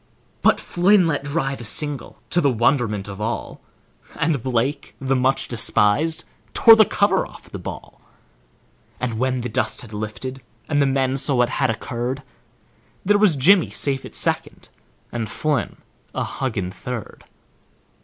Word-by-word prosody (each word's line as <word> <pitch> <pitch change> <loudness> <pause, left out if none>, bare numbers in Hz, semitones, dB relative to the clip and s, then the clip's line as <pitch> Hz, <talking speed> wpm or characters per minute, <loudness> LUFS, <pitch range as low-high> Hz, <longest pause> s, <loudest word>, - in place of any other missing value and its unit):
But - - +4
Flynn 185 +2 +3
let 145 -4 -1
drive 135 -2 -2
a - - -7
single, 145 +5 -2
to 175 - +3
the 140 - +3
wonderment 115 -4 +1
of 100 0 -8
all, 115 +2 -4 0.5
And 150 -5 0
Blake, 130 +3 -2
the 135 0 0
much 130 +1 +1
despised, 120 +7 +2 0.3
tore 225 -1 +9
the 220 -1 +6
cover 200 +1 +2
off - - -15
the - - -6
ball, - - -9 1.0
And 115 -3 -3
when 130 0 0
the 120 - -3
dust 110 - -1
had 110 -3 -12
lifted 110 +5 -5 0.3
and 145 - +1
men 135 0 +1
saw 140 0 +1
what 120 -1 +3
had - - 0
occurred, 120 +4 -3 0.8
There 205 +2 +4
was 205 -7 +4
Jimmy 175 +7 +5
safe 135 -2 -1
at - - -9
second, - - -1 0.4
and 115 -3 -3
Flynn 150 +1 -1 0.4
a - - 0
huggin' 110 -9 -3
third. 120 +2 -7
130 Hz, 150 wpm, -22 LUFS, 120-145 Hz, 1.0 s, tore